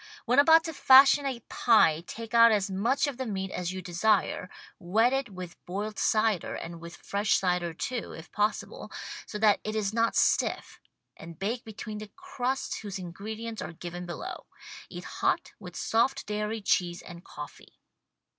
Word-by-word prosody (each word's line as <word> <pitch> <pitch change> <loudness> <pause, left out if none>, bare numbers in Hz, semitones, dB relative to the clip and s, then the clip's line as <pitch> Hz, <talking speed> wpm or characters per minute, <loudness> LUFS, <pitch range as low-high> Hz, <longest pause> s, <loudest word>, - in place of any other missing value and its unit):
When 250 +3 +4
about 320 +3 +7
to 325 -1 -5
fashion 275 +1 +7
a 250 -3 -4
pie 170 -9 +3
take 230 0 -8
out 230 0 +8
as 200 -2 +1
much 230 +11 +1
of 285 -4 -4
the 260 - -3
meat 190 -2 -3
as 180 -1 -3
you 185 0 -6
desire, 185 +1 +1 0.3
wet 220 +7 +2
it_ 270 -3 -1
with 180 -3 -9
boiled 205 +4 -4
cider 215 -4 +1
and 165 0 -7
with 170 0 -9
fresh 205 +2 0
cider, 180 -2 0
too, 235 +8 -4
if 160 +2 -11
possible, 210 +1 -2 0.4
so 210 - -5
that 210 -1 +4
it 215 0 -3
is 210 -1 -1
not 230 0 +1
stiff, - - +1 0.4
and 165 0 -11
bake 225 +6 -2
between 215 -1 -7
the 215 -1 -9
crusts 270 -8 -3
whose 205 -2 -6
ingredients 215 +5 -6
are - - -6
given 175 +1 -7
below. 175 - -7 0.4
Eat - - -8
hot - - -1
with - - -10
soft 265 +4 +1
dairy 210 +1 -3
cheese 175 -3 +1
and 170 0 -11
coffee. 150 0 -11
210 Hz, 170 wpm, -28 LUFS, 180-230 Hz, 0.4 s, out